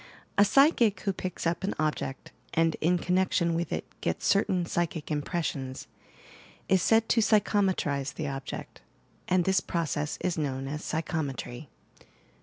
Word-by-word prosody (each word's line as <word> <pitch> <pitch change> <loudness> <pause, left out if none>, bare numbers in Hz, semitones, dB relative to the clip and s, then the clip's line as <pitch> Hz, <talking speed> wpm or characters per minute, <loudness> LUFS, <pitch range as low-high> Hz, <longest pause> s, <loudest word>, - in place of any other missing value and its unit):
A 200 - +6
psychic 235 - +4
who 195 - 0
picks 185 -1 -5
up 170 +3 0
an 195 - -1
object 150 -3 -2 0.2
and, 165 0 +3
in 180 +3 +3
connection 180 -1 +1
with 170 +1 -2
it, - - -2 0.2
gets - - -2
certain 185 -3 +2
psychic 170 -2 -2
impressions, 145 -4 -3 0.8
is 190 -1 +3
said 225 +3 +4
to 230 - +4
'psychometrize' 190 - +1
the 155 - -3
object, 135 -1 -6 0.5
and 180 -1 +2
this 190 -1 +3
process 155 -4 -2
is 180 -2 -1
known 135 -2 -2
as 150 +2 -4
psychometry." 145 -5 -3
170 Hz, 140 wpm, -28 LUFS, 150-190 Hz, 0.8 s, A